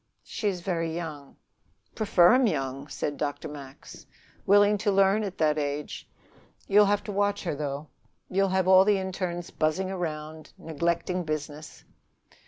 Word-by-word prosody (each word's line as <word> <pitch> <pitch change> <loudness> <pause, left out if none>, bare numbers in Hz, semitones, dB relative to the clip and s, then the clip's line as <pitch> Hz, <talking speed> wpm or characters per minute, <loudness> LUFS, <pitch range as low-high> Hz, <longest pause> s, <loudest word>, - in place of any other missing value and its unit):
"She 215 - -4
is 185 -3 -2
very 165 -3 -2
young." 155 -5 -7 0.6
"Prefer 195 -3 +4
'em 255 -1 +4
young," 135 -5 -3
said 145 0 -4
Dr. 145 +1 -3
Max. 140 -2 -11 0.4
"Willing 205 +1 +5
to 210 0 +1
learn 195 +2 +3
at 195 -3 -5
that 155 -1 +2
age. 145 0 -4 0.6
You'll 210 +1 +6
have 205 0 +1
to 210 - -6
watch 205 0 0
her, 175 - -2
though. 145 0 -4 0.4
You'll 195 +1 +1
have 190 0 +1
all 190 0 +7
the 205 0 +3
internes 185 -2 -4
buzzing 165 +5 -1
around, 155 -3 -6
neglecting 170 +2 -2
business." 155 -1 -6
175 Hz, 150 wpm, -27 LUFS, 150-195 Hz, 0.6 s, all